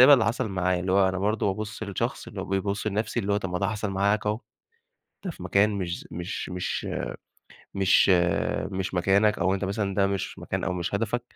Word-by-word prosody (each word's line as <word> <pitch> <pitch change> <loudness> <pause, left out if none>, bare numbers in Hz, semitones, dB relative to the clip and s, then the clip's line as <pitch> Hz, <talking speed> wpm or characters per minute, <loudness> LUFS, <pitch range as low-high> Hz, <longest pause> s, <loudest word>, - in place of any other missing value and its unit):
اللي 130 -2 +8
حصل 115 0 0
معايا، 90 -1 0
اللي 95 0 -1
هو 95 -1 +5
أنا 95 0 -2
برضو 105 0 +1
بابُصّ 110 +1 -6
للشخص 100 -3 -3
اللي - - -6
هو - - -3
بيبُصّ 100 +2 -1
لنفسي، 110 +3 0
اللي 100 0 -1
هو 100 - +3
طب 95 -3 -3
ما 90 - -1
ده 100 - 0
حصل 105 -2 -2
معاك 100 +2 +1
هو، 105 +3 0 0.9
أنت 180 - -3
في 90 - -10
مكان 100 +3 +3
مش 90 -3 -2
ز - - -14
مش 85 +3 -4
مش 90 0 -3 0.9
مش 95 0 +4 0.6
مش 95 0 -2
مكانك، 100 +4 +3
أو 95 +2 +2
أنت 100 - -2
مثلًا 100 0 -1
ده 100 0 +3
مش 100 -1 -3
مكان - - -3
أو 95 - 0
مش 90 +2 -2
هدفك، 115 +3 0
100 Hz, 210 wpm, -26 LUFS, 95-105 Hz, 0.9 s, اللي